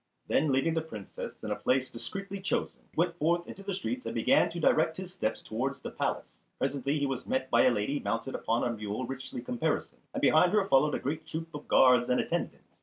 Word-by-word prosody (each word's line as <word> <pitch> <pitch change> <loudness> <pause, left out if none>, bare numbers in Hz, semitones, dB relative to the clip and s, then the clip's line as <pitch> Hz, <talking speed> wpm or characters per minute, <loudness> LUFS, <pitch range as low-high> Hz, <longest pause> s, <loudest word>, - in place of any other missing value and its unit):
Then 150 0 +2
leaving 135 +5 +2
the 160 - +1
Princess 110 -11 -8
in - - -3
a - - +1
place 130 0 +1
discreetly 195 +10 -6
chosen 190 - -1
he - - -29
went 170 +1 +2
forth 170 +3 +1
into 195 - -9
the 195 -1 -3
streets 250 +7 -3
and - - -5
began 275 - +4
to 170 - -5
direct 160 0 +3
his 185 -1 -7
steps 115 - -2
towards 135 +5 -2
the - - -6
palace. - - -1 0.3
Presently 140 +1 0
he 145 - +1
was 135 -2 -3
met 130 0 -1
by 120 - +5
a - - +7
lady 120 +5 0
mounted 115 +3 -2
upon 115 +1 0
a 120 -1 0
mule 105 +3 -3
richly 135 -1 -6
caparisoned, 125 -1 -2
and - - -3
behind 175 +5 +5
her 205 -2 +3
followed 145 +1 +4
a - - -2
great 155 +4 -3
troop 165 0 -5
of 150 - -8
guards 125 -2 +5
and 125 - +3
attendants. - - -2
140 Hz, 225 wpm, -30 LUFS, 125-170 Hz, 0.3 s, a